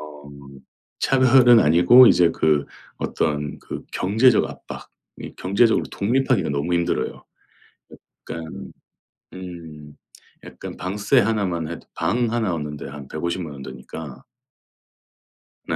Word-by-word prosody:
어 75 -1 -11 0.8
차별은 130 -3 +5
아니고 90 +11 +7
이제 85 -1 +4
그 75 -2 +1 0.3
어떤 75 -1 -2
그 - - -8
경제적 110 +5 +3
압박, - - -10 0.3
이 - - -8
경제적으로 105 +5 +2
독립하기가 130 - 0
너무 70 +5 -1
힘들어요 85 0 -2 1.1
약간 80 -1 -7 0.6
음 80 -5 -10 0.5
약간 - - -10
방세 105 +7 0
하나만 100 -7 -1
해도 85 - -8
방 120 -1 0
1 110 -7 0
얻는데 75 -2 -6
한 70 -1 -10
1,500,000 85 -2 -4
원 70 -1 -10
드니까. 75 0 -9 1.4
네. - - -2
85 Hz, 215 characters per minute, -22 LUFS, 75-115 Hz, 1.4 s, 아니고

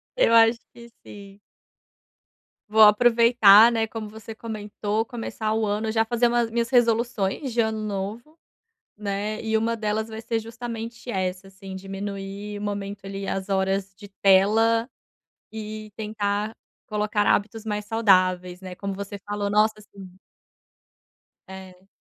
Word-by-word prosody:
Eu - - +3
acho 230 0 +6
que 235 0 -13 0.2
sim. 200 0 -12 1.3
Vou 220 +1 +4
aproveitar, 230 0 +7
né, 225 -1 0
como 220 -1 -7
você 220 +1 -10
comentou, 215 0 -3
começar 225 -3 -4
o 220 0 0
ano 210 +2 -1
já 225 0 +2
fazer 240 +1 +1
umas 235 -1 +1
minhas 230 0 -1
resoluções 235 0 +1
de 235 - +2
ano 220 -1 -1
novo, 215 +9 -5 0.6
né, 210 +1 -3
e 220 0 0
uma 230 +1 -1
delas 215 +1 -2
vai 220 0 -7
ser 225 0 -2
justamente 230 +1 -7
essa, 185 -1 -3
assim, 195 0 -11
diminuir 195 +1 -6
o - - -8
momento, 200 -1 -5
ali, 195 0 -5
as 190 0 -3
horas 195 0 -1
de 205 0 -13
tela, 220 +5 +4 0.6
e 215 -1 -7
tentar 210 0 -2 0.3
colocar 210 -1 -1
hábitos 220 +2 +1
mais 210 -1 -3
saudáveis, 185 -4 +2
né, 185 -1 -8
como 200 +1 -5
você 200 +1 -6
falou. 205 0 -2
Nossa, 215 +1 +2
sim. 195 -2 -13 1.4
É. 190 0 -12
210 Hz, 140 wpm, -24 LUFS, 200-225 Hz, 1.4 s, aproveitar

